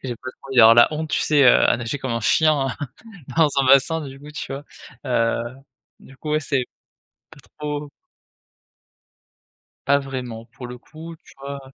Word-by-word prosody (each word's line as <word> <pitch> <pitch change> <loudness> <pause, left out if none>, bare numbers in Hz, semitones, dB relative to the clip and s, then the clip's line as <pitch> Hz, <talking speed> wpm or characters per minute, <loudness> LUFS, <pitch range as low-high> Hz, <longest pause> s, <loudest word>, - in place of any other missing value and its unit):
J'ai 125 -3 -5
pas 130 - -8
trop 135 - -17
envie 135 - -5
d'avoir 115 -1 +8
la 120 - +7
honte, 155 +1 -4
tu - - +1
sais, 145 -2 +3
heu, 125 - +6
à - - +3
nager 120 +4 -4
comme 130 -2 -5
un 115 0 -1
chien 150 +4 +3 0.7
dans 160 -2 +5
un 135 - +2
bassin, 140 +5 +4
du 135 +1 -11
coup, 150 +1 -12
tu 140 - -6
vois? 140 +1 -6 0.4
Heu, 115 -2 +1 0.6
du 135 - -16
coup, 150 +2 -5
ouais, 155 - +2
c'est 135 -3 -1 0.7
pas - - -15 0.2
trop 150 -1 -4 2.0
Pas 140 +1 +4
vraiment, 125 -4 -6
pour 125 +1 -11
le 125 0 -9
coup, 160 +5 -11
tu - - -18
vois? 140 0 -6
135 Hz, 185 wpm, -22 LUFS, 125-150 Hz, 2.0 s, d'avoir